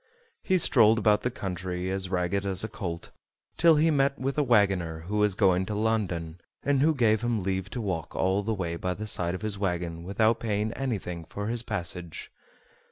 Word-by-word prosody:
He 185 - +2
strolled 110 -9 +5
about 105 -1 +3
the 125 - 0
country 90 -3 -4
as 95 -1 -3
ragged 90 +1 0
as 95 -1 +2
a - - -2
colt, 85 -6 -6 0.4
till 165 -1 +5
he 160 +2 +3
met 140 -1 +2
with 135 0 -2
a 150 - +2
wagoner 95 - +2
who 100 +6 -4
was 105 -2 +2
going 95 -3 +3
to 105 - -3
London, 90 -7 -1 0.2
and 140 -1 +2
who 155 +2 +3
gave 110 -4 +3
him 120 -4 -1
leave 95 0 -2
to 120 - -5
walk 90 -7 -4
all 95 +2 +1
the 110 +2 -2
way 85 -5 -2
by 90 +1 -2
the 110 - -6
side 90 -4 0
of 95 - -8
his 105 -2 -3
wagon 85 -3 -2
without 110 +5 +1
paying 110 -1 -1
anything 95 -11 -4
for 105 +6 -5
his 120 0 -1
passage. 90 -6 -4
100 Hz, 200 wpm, -27 LUFS, 90-115 Hz, 0.4 s, strolled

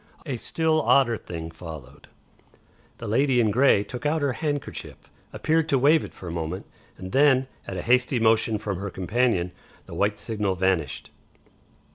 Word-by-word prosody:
A 135 -5 -3
still 160 +5 +1
odder 125 -2 +4
thing 85 -5 -7
followed; 80 -5 -11 0.9
the - - -7
lady 130 +4 +2
in 110 -3 +3
grey 125 -3 +4
took 125 +3 -8
out 150 0 0
her 140 -2 +1
handkerchief, 145 +1 -4 0.4
appeared 160 0 0
to 140 - +3
wave 150 +5 +4
it - - -8
for 90 - -11
a - - -4
moment, 85 +2 -4 0.3
and 95 0 -8
then 135 -2 +4 0.2
at 95 - -5
a 90 - -4
hasty 125 +1 +2
motion 110 -1 +3
from 100 -3 -4
her 100 +1 -4
companion 95 -1 0 0.3
the - - -11
white 105 +1 0
signal 105 -4 -2
vanished. 95 -2 -1
115 Hz, 165 wpm, -25 LUFS, 95-135 Hz, 0.9 s, odder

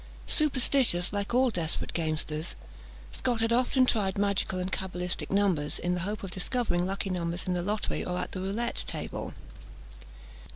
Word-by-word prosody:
Superstitious 260 - +3
like 205 +1 -1
all 250 +1 +4
desperate 165 -5 -1
gamesters, 155 -1 -1 0.6
Scot 245 -3 -1
had 225 +1 +2
often 255 +2 +4
tried 200 -6 +1
magical 200 -2 +1
and 185 +1 -2
cabalistic 180 -1 -3
numbers, 190 -7 +1
in 175 - -1
the 180 - -1
hope 205 +4 -3
of 190 - -5
discovering 185 -2 0
lucky 195 0 -2
numbers 175 -1 -1
in 185 - 0
the 175 - 0
lottery 205 +4 -1
or 180 0 -2
at - - -3
the 185 - -4
roulette 215 +5 -2
tables. - - -4
190 Hz, 160 wpm, -29 LUFS, 180-225 Hz, 0.6 s, all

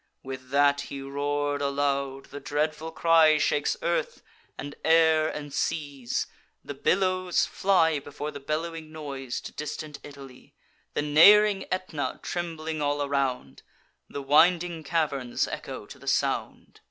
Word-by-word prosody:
With 130 -1 -8
that 140 +1 +3
he 140 - -6
roar'd 145 +1 -2
aloud: 140 -1 -1
the 145 - -6
dreadful 155 +3 -2
cry 160 -2 +5
Shakes 150 -1 +1
earth, - - -1 0.3
and 145 - -6
air, 160 -1 +4
and 145 -2 -7
seas; 140 -6 -2 0.4
the - - -5
billows 185 +4 +1
fly 165 -6 +2
Before 145 +1 -6
the 145 - -8
bellowing 155 +2 -4
noise 140 -5 -5
to - - -8
distant 150 0 -6
Italy. 140 -3 -13 0.4
The - - 0
neighb'ring 195 +7 +6
Aetna 185 -6 -3
trembling 160 -2 -4
all 145 0 0
around, 140 -3 -2 0.5
The 140 - -6
winding 165 +3 +3
caverns 140 -6 -1
echo - - -6
to - - -13
the - - -14
sound. - - -1
150 Hz, 130 wpm, -27 LUFS, 140-165 Hz, 0.5 s, neighb'ring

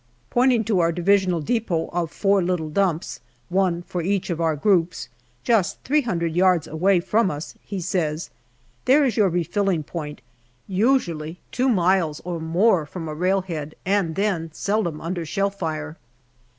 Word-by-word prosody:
Pointing 245 -2 +3
to 210 -3 +1
our 170 -1 +3
Divisional 180 0 +2
depot 185 -4 -1
of 170 -2 -1
four 195 +3 +2
little 175 -3 -1
dumps, 180 -2 0 0.3
one 180 -2 +1
for 175 0 -4
each 190 +1 -1
of 170 -1 -2
our 160 -2 +2
groups, 170 - +1 0.3
just 200 -5 +2
three 300 +3 +2
hundred 170 - -2
yards 180 -2 +3
away 180 +4 +2
from 210 +4 +1
us, 150 0 -6
he 200 -2 -5
says: 170 -3 -2 0.3
" 125 0 -37
There 280 +3 +5
is 245 -6 0
your 205 -3 +4
refilling 175 0 0
point, 150 -3 -6 0.5
usually 180 - 0
two 260 +1 +1
miles 180 -7 +2
or 175 -1 -4
more 165 +1 +2
from 165 +1 -6
railhead, 170 -2 -2
and 190 -4 +1
then 190 -5 0
seldom 200 -7 -1
under 170 +1 -3
shell 195 +5 -1
fire." 160 -4 -4
180 Hz, 155 wpm, -23 LUFS, 160-200 Hz, 0.5 s, There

